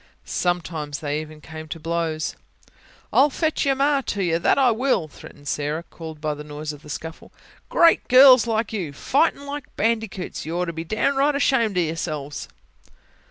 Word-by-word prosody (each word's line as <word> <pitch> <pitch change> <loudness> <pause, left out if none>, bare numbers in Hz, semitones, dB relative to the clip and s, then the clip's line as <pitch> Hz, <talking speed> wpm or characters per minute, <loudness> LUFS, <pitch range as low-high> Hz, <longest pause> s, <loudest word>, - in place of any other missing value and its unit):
Sometimes 165 -5 -2
they 150 0 -2
even 155 0 -11
came 155 0 -9
to 165 - -6
blows. 165 -1 -2 0.8
"I'll 280 +3 +6
fetch 310 0 -1
your 270 - +3
ma 280 +1 +2
to 200 -1 -1
you 165 -2 +1
that - - +3
I 260 -3 +5
will!" 235 -7 +1
threatened 145 -1 -14
Sarah, 150 +3 -2
called 160 -3 -10
by 150 0 -1
the 150 0 -8
noise 150 0 -6
of 145 - -12
the 150 - -14
scuffle. 160 +2 -7 0.4
"Great 335 -1 +4
girls 255 -1 +8
like 225 -1 -1
you 175 -9 -3
fightin' 280 - +1
like 285 -1 -7
bandicoots! 220 -4 -2
You 165 +3 -4
ought 180 - 0
to 170 - -4
be 165 0 -5
downright 275 - +1
ashamed 235 -8 +2
o' - - +4
yourselves." 155 -3 -4
170 Hz, 175 wpm, -23 LUFS, 155-255 Hz, 0.8 s, girls